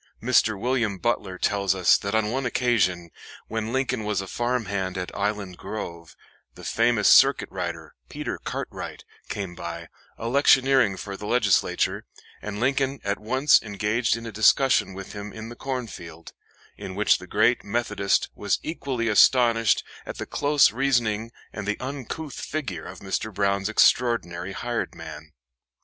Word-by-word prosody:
Mr. 110 -4 +2
William 120 -4 0
Butler 95 -4 -1
tells 100 -1 +1
us 90 -2 +5
that 100 +2 -2
on 110 -1 +1
one 135 +2 -1
occasion, 100 -9 +1 0.4
when 110 0 -3
Lincoln 130 -3 -1
was 105 -2 -1
a 95 - -4
farmhand 100 -5 -2
at 90 -1 -5
Island 100 -3 -2
Grove, 85 -6 -7 0.4
the - - -12
famous 115 -2 +2
circuit - - +6
rider, - - -5 0.2
Peter - - -5
Cartwright, - - -6 0.2
came 95 -4 -4
by, 85 -1 -7 0.3
electioneering 130 -3 +3
for 100 -1 -6
the 105 +2 -7
Legislature, 105 -5 +1 0.4
and 105 0 -5
Lincoln 135 +2 0
at 100 -1 -1
once 130 +6 +4
engaged 110 +3 0
in 115 - -8
a 115 - -5
discussion 110 -1 +3
with 95 0 -8
him 105 0 -7
in 110 +2 -8
the 120 - -9
cornfield, 110 -12 -6 0.4
in 95 - -7
which 105 +1 +3
the 90 - -11
great 110 +6 +2
Methodist 105 -2 0
was 100 -2 0
equally 135 -7 -3
astonished 115 0 +4 0.2
at - - -6
the - - -4
close 145 -5 +3
reasoning 115 -3 0 0.2
and 105 -1 -6
the 105 - -1
uncouth 140 +2 -6
figure 155 -3 -4
of - - -10
Mr. 100 +2 -3
Brown's 100 0 0
extraordinary 100 -6 +2
hired 120 +3 -3
man. - - -10
110 Hz, 150 wpm, -25 LUFS, 100-125 Hz, 0.4 s, circuit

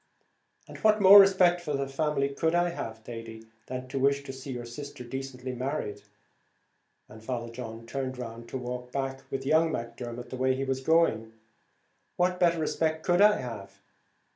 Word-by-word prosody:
"And - - -11
what 215 0 +4
more 200 +1 +10
respect 185 -3 +5
for 150 -4 -3
the 140 -1 -1
family 140 0 0
could 160 +4 0
I 175 0 +3
have, 115 -9 -6
Thady, 115 -1 -8 0.2
than 130 0 -5
to 135 +1 -3
wish 140 +1 +2
to 135 - -7
see 135 +1 -8
your 120 -1 -5
sister 135 +2 -8
decently 130 0 -6
married?" 125 -5 -3 1.1
and 110 0 -14
Father 120 -1 -4
John 115 -1 -8
turned 130 +1 -4
round 115 -1 -8
to - - -4
walk 125 0 -6
back 135 0 -3
with 135 0 -4
young 160 +3 +3
Macdermot 120 0 -6
the 130 - -5
way 130 0 +2
he 135 - -2
was 135 -1 -2
going, 130 -8 +2 0.8
"what 180 0 +1
better 170 -1 +3
respect 160 0 -1
could 175 +1 +3
I 210 -4 +6
have? 100 -6 -8
135 Hz, 175 wpm, -28 LUFS, 120-160 Hz, 1.1 s, more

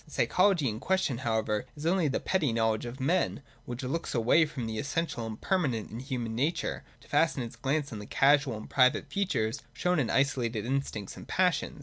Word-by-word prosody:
The - - -19
psychology 180 -9 +3
in 110 -1 -2
question 185 -7 0
however 110 -3 0
is 150 +1 -8
only 175 -1 +3
that 135 - -2
petty 165 -9 +1
know 115 0 +2
ledge 110 +2 -3
of 120 +3 -8
men, 145 +1 0 0.2
which 120 +2 -6
looks 135 +5 -3
away 125 +8 +4
from 135 -6 -5
the 110 -1 -3
essential 140 -5 -2
and 110 -1 -6
permanent 140 - 0
in 115 - -6
human 125 -4 -3
nature 145 +9 -1 0.2
to - - -18
fasten 160 -5 +2
its 115 - -8
glance 140 0 -1
on 105 - -5
the 105 - -9
casual 140 -3 +3
and 110 - -9
private 130 -2 +3
features 140 - -1
shown 180 -2 +1
in 125 - 0
isolated 120 -6 +1
instincts 125 -6 -3
and - - -10
passions. 180 -5 +1
135 Hz, 205 wpm, -29 LUFS, 115-155 Hz, 0.2 s, away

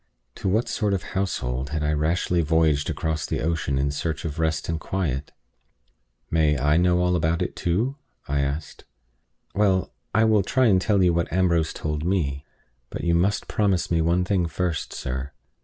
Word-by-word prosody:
To 95 - -3
what 110 +5 +1
sort 105 -3 0
of 95 - -3
household 65 -9 -2
had 75 0 -2
I 75 +1 +1
rashly 85 +3 +1
voyaged 80 -2 +2
across 80 -1 -2
the - - -2
ocean 80 -4 -1
in 70 +1 +1
search 80 +3 -3
of 80 0 -4
rest 80 -2 0
and 80 -1 -2
quiet? 75 -9 -2 1.0
"May 75 -2 +3
I 75 +3 +2
know 90 +1 +3
all 90 0 +2
about 85 0 +1
it - - -5
too?" 110 +11 0 0.3
I 70 0 0 0.2
said. 75 -2 -13 0.7
"Well, 95 -2 +1 0.2
I 110 - +5
will 110 -2 +4
try 130 +7 +2
and 95 -5 +4
tell 100 -1 +2
you 90 -1 +4
what 85 0 -1
Ambrose 85 -3 +2
told 75 -1 -3
me. 75 -6 0 0.5
But - - -6
you 85 0 +2
must 95 +5 +1
promise 100 -5 0
me 85 -1 +3
one 85 +3 +2
thing 90 -2 +1
first, 85 0 -2
sir. 65 +3 -4
85 Hz, 180 wpm, -24 LUFS, 75-95 Hz, 1.0 s, I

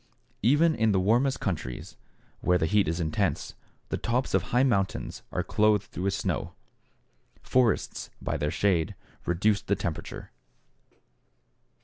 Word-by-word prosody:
Even 150 +9 +4
in 110 -6 +2
the 95 - +3
warmest 120 +8 +2
countries, 75 -10 -4 0.4
where 90 - +3
the 80 - +1
heat 100 +3 +3
is 80 +2 -1
intense, 80 -2 -1 0.4
the - - -1
tops 125 +3 -1
of - - +4
high 125 +1 +2
mountains 100 -7 0
are - - -1
clothed 105 -1 +1
with 95 +2 0
snow. - - -2 0.9
Forests, 125 -4 +1
by - - -2
their 75 - 0
shade, 85 -2 +1 0.3
reduce 100 +4 +2
the 100 - 0
temperature. 85 -4 -5
100 Hz, 130 wpm, -28 LUFS, 90-115 Hz, 0.9 s, Even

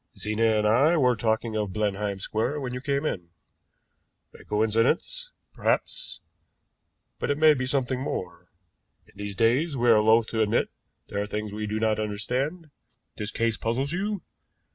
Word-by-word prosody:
Zena 110 +1 +1
and 105 - +1
I 140 +10 +4
were 125 -4 +4
talking 110 0 0
of 105 -3 -1
Blenheim 105 -1 -1
Square 110 +9 -1
when 125 -2 -4
you 125 - -4
came 140 +2 -1
in. 90 - -3 1.0
A - - -14
coincidence? 115 - +1 0.2
Perhaps, - - -1 1.0
but - - -2
it 145 - +1
may 155 0 +7
be 130 -3 -2
something 130 -1 0
more. 90 -8 -5 0.6
In - - -23
these 100 -1 -5
days 130 - +2
we 120 -1 +4
are 110 -2 +6
loath 110 +1 +5
to 110 - 0
admit 110 +2 +1 0.4
there 100 - -2
are 105 - -3
things 105 0 -4
we 105 0 -3
do 105 +1 -2
not 110 -1 +1
understand. 125 - -2 0.5
This 105 - -3
case 115 0 0
puzzles 130 +5 -1
you?" 200 +2 -2
115 Hz, 165 wpm, -26 LUFS, 105-135 Hz, 1.0 s, may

